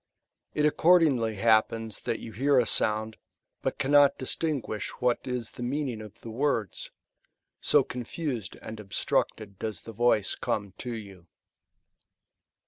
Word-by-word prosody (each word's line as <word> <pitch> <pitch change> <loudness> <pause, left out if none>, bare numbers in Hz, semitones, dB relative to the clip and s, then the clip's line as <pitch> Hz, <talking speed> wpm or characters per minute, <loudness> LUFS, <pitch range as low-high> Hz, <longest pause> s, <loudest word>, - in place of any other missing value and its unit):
It 150 - +2
accordingly 150 -8 +4
happens 110 +1 +2
that 115 -2 -1
you 115 - -8
hear 135 +5 +2
a 125 - +5
sound, 110 0 +1 0.4
but - - -2
cannot 145 +1 +5
distinguish 135 -5 -2
what 125 -1 +2
is 125 -3 -3
the - - -10
meaning 125 -2 -2
of 105 -1 -12
the 115 - -8
words; 115 - -1
^ - - -56 0.7
so 145 -2 +5
confused 125 - -4
and 110 0 -7
obstructed 100 0 -1
does 110 -6 -4
the 115 - -9
voice 110 -2 +2
come 100 -3 -2
to 125 - -4
you. 100 -6 -8
115 Hz, 135 wpm, -28 LUFS, 110-135 Hz, 0.7 s, a